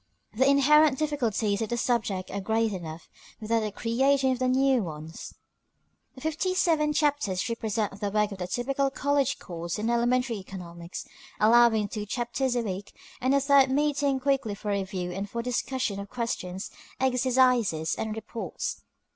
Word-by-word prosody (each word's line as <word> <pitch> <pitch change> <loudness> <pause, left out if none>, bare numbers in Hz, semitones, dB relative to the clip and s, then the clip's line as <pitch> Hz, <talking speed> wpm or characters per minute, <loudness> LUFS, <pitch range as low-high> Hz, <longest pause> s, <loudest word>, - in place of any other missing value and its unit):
The 260 +5 +3
inherent 285 +1 +5
difficulties 235 -9 0
of 220 - -2
the 240 - -1
subject 220 -6 -1
are 200 - -3
great 220 +1 +1
enough, 165 -3 -7 0.3
without 225 +1 +1
the 215 -1 -2
creation 265 +5 +2
of 255 0 -2
new 260 0 +3
ones. 160 -2 -7 0.8
The 260 - -12
fifty 320 +5 -1
seven 320 -5 +2
chapters 290 -11 0
represent 220 -3 -2
the 205 - 0
work 210 0 +1
of 195 - -7
the 180 - -3
typical 275 +6 0
college 280 0 0
course 170 -1 -5
in 220 +2 -1
elementary 240 0 +1
economics, 175 -3 -8 0.3
allowing 225 -1 +5
two 210 +1 -5
chapters 245 +3 -1
a 240 - +1
week, 195 -2 -5 0.3
and 260 +2 +3
a - - +5
third 275 -1 +5
meeting 285 -1 +1
weekly 270 -7 +1
for 210 0 -4
review 190 -2 -2
and 195 +3 -4
for 235 +2 -3
the 250 - -3
discussion 250 -5 -1
of 200 0 -7
questions, 195 -6 -4 0.3
exercises, 250 -9 +2
and 220 -1 -3
reports. 220 +1 -5
235 Hz, 160 wpm, -27 LUFS, 200-265 Hz, 0.8 s, inherent